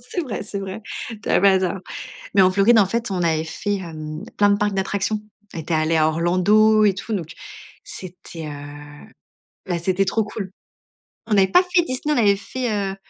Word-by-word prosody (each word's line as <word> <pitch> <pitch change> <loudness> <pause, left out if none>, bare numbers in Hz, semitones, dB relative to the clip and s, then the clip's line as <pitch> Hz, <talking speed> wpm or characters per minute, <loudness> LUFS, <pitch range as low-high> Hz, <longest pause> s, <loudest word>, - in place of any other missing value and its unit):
c'est - - -1
vrai, 240 -9 -4
c'est 205 -1 -5
vrai, 195 +2 -6 0.4
tu - - -7
as - - +4
pas 195 0 +5
tort. 185 +1 -1 0.6
Mais 200 - +6
en 185 0 +5
Floride, 200 +4 +5
en 205 - +5
fait, 230 +3 -2
on 185 -2 -1
avait 160 -2 +1
fait, 205 +5 -3
hem, 155 -2 -7
plein 205 0 +5
de 200 - +3
parcs 205 0 0
d'attractions. 195 +2 -1 0.3
On - - -5
était 160 +1 -3
allé 160 +1 +2
à 155 0 +4
Orlando 195 +7 +4
et 200 - +4
tout, 200 +4 -5
donc 175 -4 -4 0.5
c'était, 175 -3 -8
heu, 145 0 -10 0.6
ben, 175 -2 -1
c'était 185 +3 +1
trop 215 +3 0
cool. 205 -2 -6 0.8
On 225 - 0
avait 195 -2 +5
pas 200 - +5
fait 360 -1 +2
Disney, 295 0 -1
on - - 0
avait 205 -4 +4
fait, 245 +4 -4 0.2
heu, - - -7
195 Hz, 200 wpm, -22 LUFS, 170-210 Hz, 0.8 s, Mais